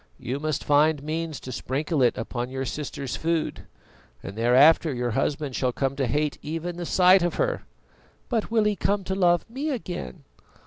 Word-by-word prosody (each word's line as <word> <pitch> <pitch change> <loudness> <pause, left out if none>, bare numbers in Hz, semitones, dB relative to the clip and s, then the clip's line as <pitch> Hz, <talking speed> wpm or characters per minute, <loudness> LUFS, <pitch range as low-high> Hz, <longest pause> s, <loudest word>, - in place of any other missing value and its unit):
"You 130 +3 -4
must 155 -1 -2
find 150 0 +3
means 160 0 -3
to 130 - -7
sprinkle 140 +5 -2
it 125 - +3
upon 120 +2 -4
your 135 0 -3
sister's 140 0 -4
food, 165 0 -2 0.6
and 100 - -7
thereafter 135 +8 +5
your 120 -2 -2
husband 140 +3 -1
shall 130 -1 +1
come 135 +2 -1
to 135 -3 0
hate 150 +4 -1
even 165 +3 -4
the 175 -1 -4
sight 185 +1 +5
of 175 0 0
her." - - -1 0.6
"But 230 -4 -1
will 225 -1 +3
he 210 0 +1
come 200 +2 0
to 190 - -3
love 175 -3 +2
me 270 +7 -4
again?" 180 - -5
155 Hz, 180 wpm, -25 LUFS, 130-175 Hz, 0.6 s, thereafter